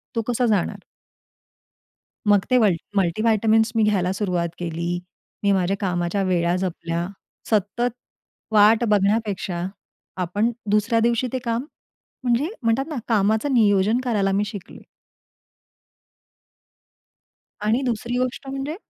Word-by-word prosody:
तो 230 - +1
कसा 245 +1 +1
जाणार? 205 -6 0 1.5
मग 205 -2 +4
ते 255 - +4
मल 205 -6 +4 0.2
मल्टीव्हिटॅमिन 215 +4 +3
मी 225 - +3
घ्यायला 190 -4 +2
सुरुवात 180 -4 -1
केली. 170 +1 -2 0.4
मी 200 - +3
माझ्या 190 0 +1
कामाच्या 180 0 -1
वेळा 175 -2 +1
जपल्या. 170 -2 -3 0.4
सतत 220 +3 0 0.6
वाट 215 +2 +5
बघण्यापेक्षा 200 -3 0 0.6
आपण 205 +7 0 0.2
दुसऱ्या 220 +2 +2
दिवशी 235 +2 +1
ते 260 - 0
काम 235 +3 -1 0.6
म्हणजे 250 +7 +1
म्हणतात 230 +4 +2
ना 310 - -5
कामाचं 220 +5 +2
नियोजन 210 0 +3
करायला 205 -6 +1
मी 205 +2 +1
शिकली. 200 -4 -9 2.8
आणि 225 +5 +2
दुसरी 240 +1 -2
गोष्ट 255 +2 -2
म्हणजे 275 +3 -4
210 Hz, 115 wpm, -23 LUFS, 190-235 Hz, 2.8 s, वाट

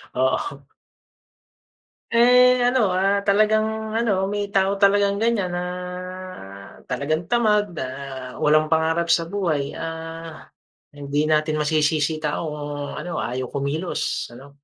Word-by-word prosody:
Oo. 130 +2 -1 1.5
Eh, 250 +1 +5
ano, 255 +1 +2 0.2
ah, 195 +2 +2
talagang 215 +1 +2
ano, 225 -1 +1 0.2
may 205 0 -2
tao 195 0 +1
talagang 200 0 +3
ganyan 220 -6 +1
na 175 - -2 1.3
talagang 155 +6 -2
tamad, 210 -6 +2
na 130 - -3 0.6
walang 155 +1 +3
pangarap 160 +1 +2
sa 165 -1 +2
buhay, 160 -7 -2
ah, 165 0 -7 0.5
hindi 145 +1 -1
natin 155 0 +1
masisisi 155 0 +1
yung 155 - -9
tao 150 +2 -1
kung 145 -1 -5
ano, 175 -2 -4
ayaw 125 0 -3
kumilos 140 -1 -2
ano. 140 +4 -14
165 Hz, 120 wpm, -23 LUFS, 150-205 Hz, 1.5 s, Eh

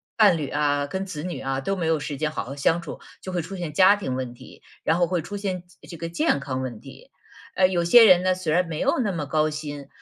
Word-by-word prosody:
伴 205 -6 +5
侣 150 -3 -3
啊、 145 -1 0
跟 190 +6 -4
子 160 -6 -6
女 180 0 -5
啊 135 0 -2
都 195 +9 -2
没 175 -3 -3
有 160 -1 +1
时 145 0 -5
间 150 +1 -1
好 155 - -4
好 135 +3 -7
相 165 +4 +1
处， 170 - -8 0.2
就 185 - -6
会 175 - 0
出 185 +5 -8
现 170 -4 -5
家 190 +5 +6
庭 130 -11 -3
问 130 -2 -4
题， 120 - -15 0.2
然 160 - +2
后 175 - +3
会 175 -1 -1
出 205 - -7
现 190 -3 -3 0.2
这 170 - -9
个 165 - -5
健 165 -4 +1
康 135 -2 -4
问 125 -4 -5
题。 - - -14 0.4
呃， 185 - +5
有 180 -2 0
些 225 +7 +8
人 185 -4 +7
呢， 185 0 +2
虽 175 -4 -2
然 180 +1 +2
没 160 -2 -5
有 - - +1
那 215 -6 0
么 160 -5 -3
高 155 +2 +1
薪， 145 -2 -6
165 Hz, 290 characters per minute, -24 LUFS, 145-185 Hz, 0.4 s, 些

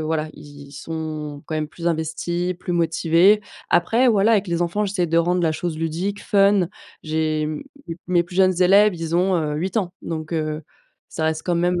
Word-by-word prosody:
voilà, 155 0 -1
ils 145 -1 -12
ils - - -16
sont, 155 -1 -6
quand 155 - -4
même, 155 -1 -2
plus 170 0 -7
investis, 170 +2 -2
plus 180 0 -5
motivés. 170 +4 +3 0.3
Après, 230 +9 +3
voilà, 215 0 +4
avec 205 -4 +2
les 170 0 -1
enfants, 175 +5 0
j'essaie 190 -3 -1
de 165 +1 0
rendre 175 +1 +2
la 160 - +2
chose 160 0 -4
ludique, 175 +6 -3
fun. 200 -3 +3 0.3
J'ai, 155 -1 -1
mmh, 155 0 -4 0.3
m 165 - -3
mes 175 -1 +3
plus 175 +1 -11
jeunes 185 -1 +3
élèves, 200 +2 +5
ils 165 0 -2
ont, 185 +1 +2
heu, 150 -2 -1
8 185 +6 -1
ans 185 -3 -3
donc 160 0 -5
heu, 155 -1 -2 0.5
ça 160 - -3
reste 160 0 -1
quand 175 - 0
même, 175 +1 +1
170 Hz, 205 wpm, -22 LUFS, 155-185 Hz, 0.5 s, élèves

